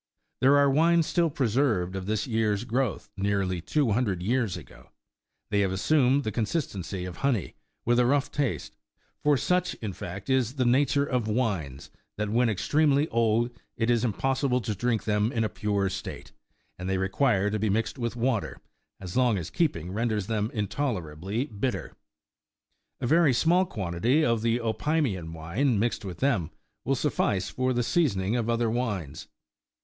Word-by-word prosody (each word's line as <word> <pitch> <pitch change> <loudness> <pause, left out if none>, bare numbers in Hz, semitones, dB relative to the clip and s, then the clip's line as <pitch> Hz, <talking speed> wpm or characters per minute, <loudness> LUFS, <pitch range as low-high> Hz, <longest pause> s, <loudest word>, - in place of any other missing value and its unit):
There 135 +2 +5
are 140 0 +5
wines 165 +4 +4
still 170 0 +1
preserved 115 -9 +1
of 95 0 -5
this 105 -1 0
year's 110 -3 0
growth, 125 -1 -2
nearly 95 -3 0
two 135 - +1
hundred 100 -5 0
years 115 -3 0
ago; 75 -8 -14 0.6
they 105 - +2
have 95 -2 +2
assumed 135 +7 +3
the 110 - -2
consistency 105 - -3
of 90 -2 -7
honey, 125 - 0 0.3
with 120 +1 +3
a 125 - +4
rough 145 +1 +1
taste; 140 -4 -2 0.5
for 145 -1 +3
such, 180 +6 0
in 105 -4 -5
fact, 95 +3 -7
is 130 -2 +1
the 130 -3 +1
nature 140 +3 +3
of 125 -5 -1
wines, 95 - -2 0.3
that, 105 0 -2
when 120 +1 +3
extremely 145 +7 +2
old, 115 +1 +2 0.3
it 115 +1 +1
is 120 -2 +2
impossible 130 +3 +1
to 110 0 -2
drink 115 0 -1
them 105 +1 +1
in 115 -3 0
a 110 - 0
pure 100 -2 -1
state; 95 0 -6 0.5
and 90 +1 -4
they 95 - +1
require 100 +1 +1
to 105 - -1
be 110 +1 0
mixed 110 +5 -1
with 115 -1 -2
water, 120 -2 -1 0.4
as 90 -2 -7
long 125 -5 +3 0.2
keeping 90 - 0
renders 110 -1 -1
them 110 0 -1
intolerably 105 - -2
bitter.45 125 0 -3 1.1
A - - -1
very 155 -1 +4
small 175 +8 +3
quantity 110 - +1
of 115 -2 +1
the 115 +1 +1
Opimian 115 - -1
wine, 95 - 0
mixed 115 +2 0
with 90 -4 -7
them, 110 - +1 0.4
will 135 - +2
suffice 100 -8 0
for 130 0 0
the 120 -1 +1
seasoning 115 - +1
of 120 -1 -1
other 115 -1 +1
wines. 105 - -3
115 Hz, 165 wpm, -27 LUFS, 100-130 Hz, 1.1 s, There